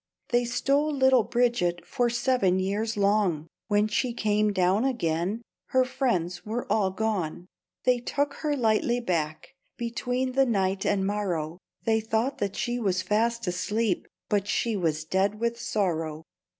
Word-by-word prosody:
They 240 -2 +2
stole 275 +5 +1
little 265 -3 +4
Bridget 235 -7 +1
For 245 -1 0
seven 240 -6 +2
years 210 +4 -1
long; 200 -6 +2 0.2
When 205 0 +3
she 235 +3 0
came 210 -1 +2
down 190 +2 +2
again 205 -4 -1 0.2
Her 260 -1 +3
friends 180 -10 -1
were 225 +3 -3
all 200 -3 +3
gone. 190 -5 -2 0.4
They 250 -1 +3
took 285 +4 -1
her 295 -2 0
lightly 235 0 +2
back, 170 - -2 0.2
Between 245 +2 -2
the 270 +1 +3
night 195 -3 0
and 195 -2 +1
morrow, 180 -5 -2 0.2
They 225 -1 +2
thought 225 +4 -1
that 200 -1 -2
she 240 0 -1
was 185 -5 0
fast 230 +4 +1
asleep, 195 +3 -1 0.2
But 205 -1 0
she 230 +1 0
was 160 -5 0
dead 195 +5 0
with 235 0 -1
sorrow. 165 -8 -1
215 Hz, 150 wpm, -27 LUFS, 185-240 Hz, 0.4 s, little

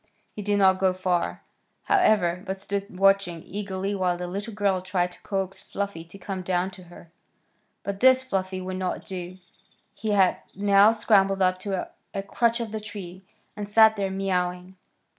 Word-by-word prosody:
He 210 - -5
did 205 0 +1
not 190 -1 +4
go 190 -1 +3
far, 185 -2 -1 0.4
however, 205 - +3
but 190 +1 -3
stood 200 -1 -4
watching 195 -4 +3
eagerly 195 0 -3
while 185 -3 0
the 180 - -4
little 200 +5 -5
girl 200 -3 0
tried 180 -1 -1
to - - -14
coax 195 -1 -3
Fluffy 200 -5 -4
to 170 +4 -14
come 190 0 -5
down 180 +1 -1
to 185 -1 -13
her. 170 -1 -15 0.7
But 200 -1 -4
this 260 +1 +6
Fluffy 185 -5 -2
would 185 0 -4
not 185 -1 -3
do. 185 -1 -6 0.6
He 215 -1 -2
had 190 -2 +4 0.2
now 200 +2 +5
scrambled 195 -3 +3
up 185 0 +2
to 190 -1 -3 0.3
a 195 - -2
crotch 235 +4 +1
of 230 -2 -4
the 220 0 -4
tree, 195 -4 -8 0.3
and 205 -1 -6
sat 220 +1 +6
there 200 -2 -1
mewing. 180 -1 -2
195 Hz, 175 wpm, -25 LUFS, 185-205 Hz, 0.7 s, this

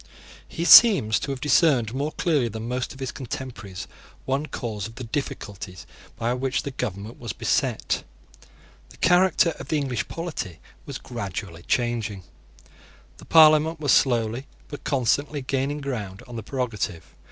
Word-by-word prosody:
He 170 - -4
seems 185 - +8
to - - -5
have 135 -1 -3
discerned 135 -6 +3
more 145 +4 -2
clearly 150 -9 +1
than 110 +1 -6
most 125 +1 -2
of 130 - -12
his 130 -1 -3
contemporaries 110 -7 -7 0.4
one 140 +3 -1
cause 110 -7 -4
of 115 - -13
the 125 - -7
difficulties 105 -7 -5 0.3
by 115 +2 0
which 130 +1 -1
the 140 - -4
government 105 -2 -5
was 115 -5 -5
beset. - - 0 0.9
The - - -17
character 180 -1 +4
of - - -8
the 155 - 0
English 130 -7 -2
polity 155 - -5 0.3
was - - -5
gradually 100 -7 -6
changing. 115 -5 -1 0.9
The - - -14
Parliament 155 0 +6
was 145 -3 +1
slowly, 120 0 +2 0.2
but 145 - -8
constantly, 140 +2 0
gaining 135 +2 -1
ground 105 -9 -5
on 120 - -9
the 115 - -4
prerogative. 110 - -4
125 Hz, 150 wpm, -24 LUFS, 110-145 Hz, 0.9 s, seems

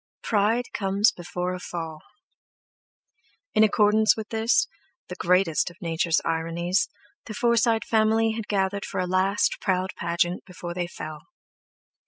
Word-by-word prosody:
"Pride 220 +3 +2
comes 200 +2 +2
before 180 +1 -4
a 180 - -5
fall!" 165 -3 -6 1.5
In 215 - +5
accordance 215 +1 +4
with 220 0 -6
this, 225 +10 +2 0.4
the 180 - -5
greatest 180 -2 +2
of 175 +3 -17
Nature's 165 -2 +1
ironies, 170 - 0 0.4
the 215 - -6
Forsyte 235 -1 +2
family 220 0 +2
had 220 -1 -5
gathered 200 0 0
for - - -4
a 185 - 0
last 185 +2 +1
proud 185 -1 0
pageant 170 +1 -1
before 175 -1 -7
they 175 0 -2
fell. 155 -3 -8
190 Hz, 135 wpm, -25 LUFS, 175-215 Hz, 1.5 s, In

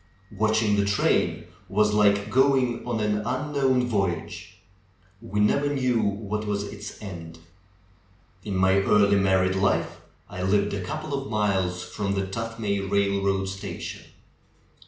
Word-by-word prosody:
Watching 110 0 +1
the 100 - +2
train 100 -1 +1 0.2
was 105 +1 +2
like 105 0 +3
go 135 +2 +4
ing 120 -2 -1
on 115 -2 -1
an 105 0 +1
unknown 130 +2 0
voyage 95 -8 -3 0.3
— 95 +1 -34
we 105 - 0
never 140 +7 +2
knew 130 -4 +1
what 105 +1 -2
was 100 -1 -1
its 105 0 -8
end. 85 -4 -8 1.1
In 100 - -4
my 95 +1 +3
early 100 0 +4
married 95 -1 +2
life 95 0 0 0.3
I 90 - -7
lived 100 +2 +1
a 95 -2 -3
couple 155 +8 -5
of 135 -1 -3
miles 95 -4 0
from 100 +2 -3
the 95 0 -1
Tuthmay 110 0 -3
railroad 100 -1 +1
station. 95 0 -6
100 Hz, 140 wpm, -25 LUFS, 95-110 Hz, 1.1 s, go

